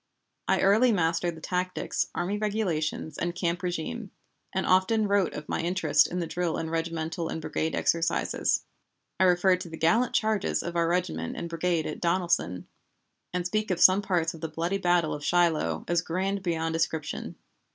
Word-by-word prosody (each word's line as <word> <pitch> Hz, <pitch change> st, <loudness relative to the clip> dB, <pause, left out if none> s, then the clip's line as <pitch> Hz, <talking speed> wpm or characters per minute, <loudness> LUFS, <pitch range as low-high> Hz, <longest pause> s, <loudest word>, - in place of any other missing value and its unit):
I -, -, +2 dB
early 220 Hz, +6 st, +5 dB
mastered 170 Hz, -2 st, +1 dB
the -, -, -12 dB
tactics, 180 Hz, +1 st, -2 dB
army 195 Hz, +4 st, -1 dB
regulations, 185 Hz, -8 st, -2 dB
and 175 Hz, 0 st, -2 dB
camp 175 Hz, -1 st, -1 dB
régime, 180 Hz, +5 st, -4 dB, 0.4 s
and 190 Hz, -, -1 dB
often 205 Hz, +4 st, +3 dB
wrote 200 Hz, -3 st, +1 dB
of 150 Hz, -, -7 dB
my -, -, -1 dB
interest 180 Hz, +3 st, +3 dB
in 180 Hz, -, -5 dB
the 175 Hz, -, -1 dB
drill 170 Hz, -1 st, -2 dB
and 160 Hz, 0 st, -4 dB
regimental 165 Hz, 0 st, -2 dB
and -, -, -3 dB
brigade 160 Hz, 0 st, -2 dB
exercises. 165 Hz, 0 st, +1 dB, 0.6 s
I 190 Hz, -, +5 dB
refer 180 Hz, +1 st, +4 dB
to 180 Hz, -, -8 dB
the 160 Hz, -, -8 dB
gallant 225 Hz, +11 st, +2 dB
charges 215 Hz, -2 st, +1 dB
of 170 Hz, 0 st, -5 dB
our 170 Hz, -1 st, +2 dB
regiment 125 Hz, -, -1 dB
and 170 Hz, -, -4 dB
brigade 165 Hz, -1 st, -1 dB
at 155 Hz, -, -5 dB
Donelson, 170 Hz, -, 0 dB, 0.7 s
and 180 Hz, -1 st, -2 dB
speak 215 Hz, +4 st, -1 dB
of 180 Hz, -2 st, 0 dB
some 190 Hz, +2 st, +7 dB
parts 175 Hz, -5 st, 0 dB
of 165 Hz, -, -11 dB
the 165 Hz, -, -2 dB
bloody 170 Hz, +5 st, -2 dB
battle 175 Hz, -3 st, +2 dB
of 145 Hz, -, -6 dB
Shiloh 160 Hz, -, +1 dB
as 175 Hz, -1 st, +2 dB
"grand 190 Hz, +4 st, -2 dB
beyond 165 Hz, -3 st, -1 dB
description." 160 Hz, -1 st, -2 dB
175 Hz, 175 wpm, -27 LUFS, 165-190 Hz, 0.7 s, some